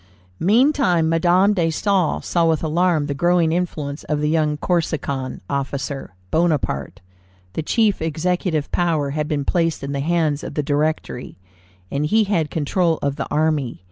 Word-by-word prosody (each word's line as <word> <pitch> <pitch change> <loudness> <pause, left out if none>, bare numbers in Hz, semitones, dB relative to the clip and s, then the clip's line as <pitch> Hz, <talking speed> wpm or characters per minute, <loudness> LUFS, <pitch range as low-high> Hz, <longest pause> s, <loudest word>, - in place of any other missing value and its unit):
Meantime 205 - +3
Madame 175 +5 +3
de 175 -5 +1
Staël 180 0 0
saw 170 - +1
with 160 -1 0
alarm 165 -1 +2
the 145 - -2
growing 175 +2 +2
influence 155 -4 -3
of 150 -1 -1
the 150 0 0
young 155 -2 +1
Corsican 150 -6 -2
officer, 140 -5 -4 0.2
Bonaparte. 145 - 0 0.5
The - - -2
chief 210 +4 +1
executive 160 0 -1
power 160 -5 0
had 150 +1 -2
been 145 -3 -1
placed 165 -4 0
in 140 - -4
the 140 - -2
hands 155 -1 0
of - - -7
the 150 - 0
Directory, 150 -3 -2 0.5
and 145 +2 0
he 220 +7 +3
had 175 -7 0
control 165 +2 0
of 140 0 -1
the 140 - -3
army. 150 - 0
160 Hz, 155 wpm, -21 LUFS, 145-175 Hz, 0.5 s, Meantime